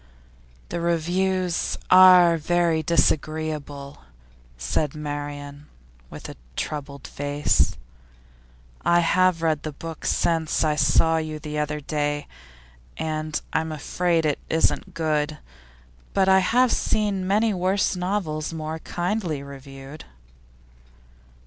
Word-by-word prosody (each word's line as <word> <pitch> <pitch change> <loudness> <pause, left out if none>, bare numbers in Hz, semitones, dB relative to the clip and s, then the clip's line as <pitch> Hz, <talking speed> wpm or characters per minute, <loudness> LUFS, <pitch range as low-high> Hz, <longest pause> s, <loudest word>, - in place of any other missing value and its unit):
'The - - -3
reviews 175 +2 0
are 180 -2 +8
very 165 0 +1
disagreeable,' 155 -3 -1 0.6
said 135 - -1
Marian 145 -1 -6 0.4
with - - -9
a - - -9 0.2
troubled 140 -2 -5
face. 145 - 0 1.1
'I 175 0 +4
have 180 0 +2
read 155 -2 +1
the 155 - -5
book 165 +2 -8
since 165 -2 +1
I 155 -1 +2
saw 160 +2 +3
you 155 -1 -3
the 150 0 -5
other 150 0 -2
day, 145 0 -2 0.7
and 155 -1 -2
I 160 - +2
am 160 0 -5
afraid 165 +2 0
it 150 -2 0
isn't 160 0 0
good, 155 -2 0 0.8
but 190 -1 +3
I 190 0 +6
have 245 +6 +3
seen 200 -3 0
many 215 +3 +2
worse 190 +2 +1
novels 180 -5 -2
more 160 0 -5
kindly 175 -4 -2
reviewed. 140 +1 -10
160 Hz, 110 wpm, -24 LUFS, 150-175 Hz, 1.1 s, are